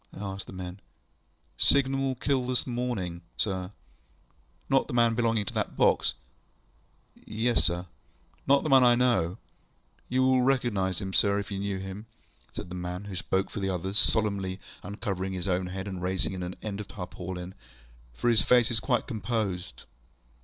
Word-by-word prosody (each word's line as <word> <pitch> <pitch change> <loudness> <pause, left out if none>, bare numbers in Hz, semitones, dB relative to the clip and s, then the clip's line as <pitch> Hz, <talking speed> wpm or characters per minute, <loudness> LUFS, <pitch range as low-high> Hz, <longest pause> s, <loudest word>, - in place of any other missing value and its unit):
ŌĆØ - - -9
I 100 -1 -3
asked 95 - -7
the - - -9
men. 90 0 -6 0.8
ŌĆ£Signal 140 -1 +4
man 135 -1 0
killed 130 -1 0
this 125 - +1
morning, 120 -9 -2 0.2
sir. 95 -2 -1 1.0
ŌĆØ 135 0 +5
ŌĆ£Not - - -6
the - - -6
man 115 -1 +4
belonging 115 -2 +1
to - - -4
that - - -2
box? - - +3 1.0
ŌĆØ - - -22
ŌĆ£Yes, 115 +2 +1
sir. 85 +1 0
ŌĆØ - - -16 0.6
ŌĆ£Not 140 +1 +5
the 155 - -1
man 135 -2 +7
I 120 -1 +6
know? 120 -9 +3
ŌĆØ 95 - -19
ŌĆ£You 125 - +1
will 130 -1 +4
recognise 120 -8 +1
him, 95 -1 -4
sir, 100 0 +4
if 100 0 -4
you 100 - -2
knew 100 -1 -2
him, 95 +3 -7 0.4
ŌĆØ - - -28
said - - -6
the - - -7
man 90 +1 -4
who 100 -2 -6
spoke 95 +1 0
for - - -4
the 95 -1 -1
others, 95 +3 +1
solemnly 100 -4 +1 0.2
uncovering 95 -1 -3
his 90 0 -4
own 90 0 +1
head, 95 +2 -5
and 95 -2 -5
raising 95 +1 -1
an 90 -1 -4
end 105 -2 -4
of 105 - -6
the - - -14
tarpaulin, 90 -1 -6 0.6
ŌĆ£for 120 - +2
his 110 - +5
face 125 0 +4
is 115 - +3
quite 125 +1 +1
composed. 105 -7 -3
100 Hz, 190 wpm, -28 LUFS, 95-120 Hz, 1.0 s, man